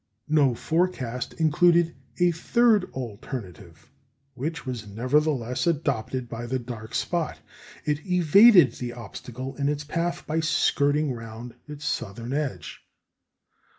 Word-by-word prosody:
No 145 Hz, -5 st, +4 dB
forecast 145 Hz, -6 st, -1 dB
included 170 Hz, +1 st, +3 dB, 0.2 s
a 175 Hz, 0 st, +4 dB
third 215 Hz, +4 st, +3 dB
alternative, 105 Hz, -, -8 dB, 0.4 s
which 150 Hz, +4 st, -4 dB
was 120 Hz, -4 st, -5 dB
nevertheless 125 Hz, -, 0 dB
adopted 130 Hz, -6 st, -1 dB
by 115 Hz, 0 st, -6 dB
the 130 Hz, +2 st, -1 dB
dark 115 Hz, -3 st, -7 dB
spot. 155 Hz, +6 st, -1 dB, 0.5 s
It 150 Hz, 0 st, -1 dB
evaded 180 Hz, -, +7 dB
the 120 Hz, -1 st, -5 dB
obstacle 125 Hz, +3 st, -8 dB
in 140 Hz, 0 st, +1 dB
its 150 Hz, 0 st, -2 dB
path 170 Hz, +3 st, -2 dB
by 155 Hz, +1 st, -1 dB
skirting 150 Hz, -3 st, +2 dB
round 115 Hz, +1 st, -8 dB
its 150 Hz, 0 st, -8 dB
southern 115 Hz, 0 st, -3 dB
edge. 135 Hz, -, -3 dB
140 Hz, 120 wpm, -26 LUFS, 120-160 Hz, 0.5 s, evaded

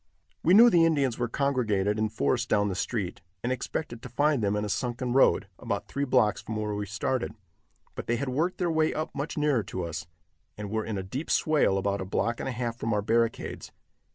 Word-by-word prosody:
We 175 Hz, +4 st, +5 dB
knew 235 Hz, +3 st, +9 dB
the 170 Hz, -3 st, +5 dB
Indians 140 Hz, -8 st, +2 dB
were 120 Hz, -, 0 dB
congregated 110 Hz, -6 st, 0 dB
in 110 Hz, 0 st, +1 dB
force 120 Hz, +3 st, 0 dB
down 105 Hz, -2 st, +2 dB
the -, -, -2 dB
street, 100 Hz, -2 st, -3 dB, 0.2 s
and 125 Hz, -, 0 dB
expected 125 Hz, -1 st, -4 dB
to 125 Hz, -, -8 dB
find 145 Hz, +2 st, +2 dB
them 100 Hz, -1 st, +1 dB
in 105 Hz, 0 st, -1 dB
a -, -, -3 dB
sunken 120 Hz, +3 st, -2 dB
road, 135 Hz, -, +4 dB
about 100 Hz, -, -3 dB
three 140 Hz, 0 st, -2 dB
blocks 125 Hz, -5 st, +2 dB
from 110 Hz, -, -6 dB
where 105 Hz, -1 st, -2 dB
we 105 Hz, 0 st, -3 dB
started, 110 Hz, +4 st, -2 dB, 0.6 s
but -, -, -7 dB
they 120 Hz, -, +2 dB
had 135 Hz, +4 st, -2 dB
worked 160 Hz, +8 st, 0 dB
their 175 Hz, -2 st, 0 dB
way 160 Hz, -1 st, +1 dB
up 155 Hz, -, -3 dB
much 140 Hz, +3 st, -4 dB
nearer 145 Hz, -5 st, +2 dB
to 95 Hz, -2 st, -5 dB
us, 85 Hz, -1 st, -5 dB, 0.5 s
and 105 Hz, -1 st, -6 dB
were 110 Hz, 0 st, 0 dB
in 110 Hz, -3 st, -3 dB
a 95 Hz, -, -3 dB
deep 130 Hz, -, -5 dB
swale 150 Hz, -11 st, +3 dB
about 100 Hz, 0 st, -1 dB
a -, -, -3 dB
block 115 Hz, +5 st, -1 dB
and -, -, -3 dB
a -, -, -2 dB
half 120 Hz, -1 st, -3 dB
from 115 Hz, -2 st, -1 dB
our 105 Hz, -, 0 dB
barricades. 115 Hz, +1 st, -1 dB
115 Hz, 225 wpm, -28 LUFS, 105-140 Hz, 0.6 s, knew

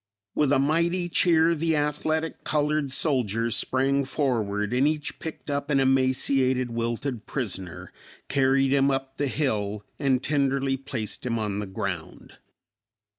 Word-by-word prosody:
With 150 Hz, -2 st, +2 dB
a 145 Hz, -, +5 dB
mighty 170 Hz, +5 st, +1 dB
cheer 165 Hz, -1 st, +4 dB
the 165 Hz, 0 st, 0 dB
athletic 155 Hz, +2 st, -1 dB
colored 150 Hz, -2 st, 0 dB
soldiers 115 Hz, -6 st, 0 dB
sprang 135 Hz, +2 st, +1 dB
forward 115 Hz, -7 st, -1 dB
and 130 Hz, +3 st, +3 dB
each 150 Hz, -1 st, -2 dB
picked 160 Hz, -2 st, -6 dB
up 140 Hz, 0 st, -2 dB
an 140 Hz, -2 st, +3 dB
emaciated, 130 Hz, -1 st, +2 dB
wilted 115 Hz, +1 st, -3 dB
prisoner, 95 Hz, -, -5 dB, 0.4 s
carried 135 Hz, 0 st, +2 dB
him 140 Hz, 0 st, +4 dB
up 135 Hz, 0 st, -2 dB
the 145 Hz, -, 0 dB
hill, 105 Hz, -8 st, -1 dB
and 135 Hz, -3 st, +1 dB
tenderly 140 Hz, -2 st, +1 dB
placed 130 Hz, -6 st, -5 dB
him 115 Hz, -2 st, -1 dB
on 105 Hz, -2 st, -2 dB
the 105 Hz, -, -4 dB
ground. 95 Hz, -3 st, -6 dB
135 Hz, 135 wpm, -26 LUFS, 120-145 Hz, 0.4 s, a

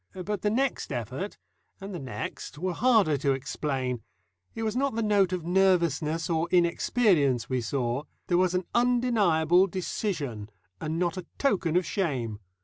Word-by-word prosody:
But 210 Hz, -2 st, -2 dB
the 210 Hz, -, +1 dB
next 255 Hz, -, -1 dB
effort 130 Hz, -, -4 dB, 0.4 s
and 195 Hz, 0 st, -7 dB
the 175 Hz, -, -4 dB
next 130 Hz, +2 st, -6 dB
were 180 Hz, +3 st, -2 dB
harder 215 Hz, -, +3 dB
to 140 Hz, 0 st, +2 dB
explain. 130 Hz, -2 st, -3 dB, 0.5 s
It 225 Hz, -, -3 dB
was 220 Hz, 0 st, -1 dB
not 275 Hz, -2 st, 0 dB
the 230 Hz, -, 0 dB
note 200 Hz, -3 st, +3 dB
of 180 Hz, -3 st, -3 dB
nervousness 170 Hz, -4 st, +2 dB
or 165 Hz, -1 st, 0 dB
inexperience 170 Hz, -, +2 dB
we 130 Hz, -1 st, +1 dB
saw; 125 Hz, +3 st, -2 dB, 0.2 s
there 175 Hz, 0 st, +2 dB
was 185 Hz, -1 st, +2 dB
an 180 Hz, -1 st, 0 dB
undeniable 205 Hz, -9 st, +3 dB
decision, 160 Hz, -, -3 dB, 0.3 s
and 155 Hz, +1 st, -3 dB
not 175 Hz, 0 st, 0 dB
a 180 Hz, -2 st, -6 dB
token 190 Hz, -, +1 dB
of 180 Hz, -, +1 dB
shame. 130 Hz, -, -2 dB
175 Hz, 155 wpm, -27 LUFS, 140-200 Hz, 0.5 s, harder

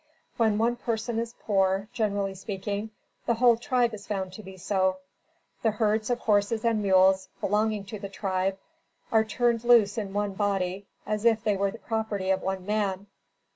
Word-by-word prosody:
When 220 Hz, -3 st, +2 dB
one 235 Hz, +2 st, +1 dB
person 230 Hz, -1 st, -2 dB
is 230 Hz, 0 st, -4 dB
poor, 195 Hz, -1 st, +1 dB
generally 200 Hz, -3 st, -1 dB
speaking, 200 Hz, +2 st, -4 dB, 0.4 s
the 235 Hz, -, +3 dB
whole 240 Hz, 0 st, +5 dB
tribe 240 Hz, -1 st, +1 dB
is 210 Hz, -1 st, -9 dB
found 190 Hz, -3 st, -3 dB
to 215 Hz, -, -8 dB
be 190 Hz, -1 st, -11 dB
so. 185 Hz, 0 st, 0 dB, 0.6 s
The 225 Hz, -, +3 dB
herds 215 Hz, +1 st, 0 dB
of 245 Hz, 0 st, 0 dB
horses 215 Hz, +1 st, +1 dB
and 225 Hz, -2 st, +2 dB
mules 190 Hz, -1 st, +4 dB
belonging 210 Hz, 0 st, 0 dB
to 205 Hz, +2 st, -7 dB
the 200 Hz, -1 st, -6 dB
tribe, 190 Hz, -1 st, -1 dB, 0.5 s
are 220 Hz, -1 st, +5 dB
turned 235 Hz, +1 st, 0 dB
loose 235 Hz, -3 st, +5 dB
in 200 Hz, -3 st, -4 dB
one 205 Hz, 0 st, -1 dB
body 195 Hz, -1 st, -1 dB, 0.2 s
as 210 Hz, 0 st, -2 dB
if 225 Hz, -2 st, +3 dB
they 210 Hz, -2 st, +2 dB
were 200 Hz, 0 st, +1 dB
the 200 Hz, -, -8 dB
property 220 Hz, -5 st, -2 dB
of 190 Hz, -, +1 dB
one 190 Hz, -1 st, -3 dB
man. 200 Hz, -2 st, -1 dB
205 Hz, 175 wpm, -27 LUFS, 195-225 Hz, 0.6 s, whole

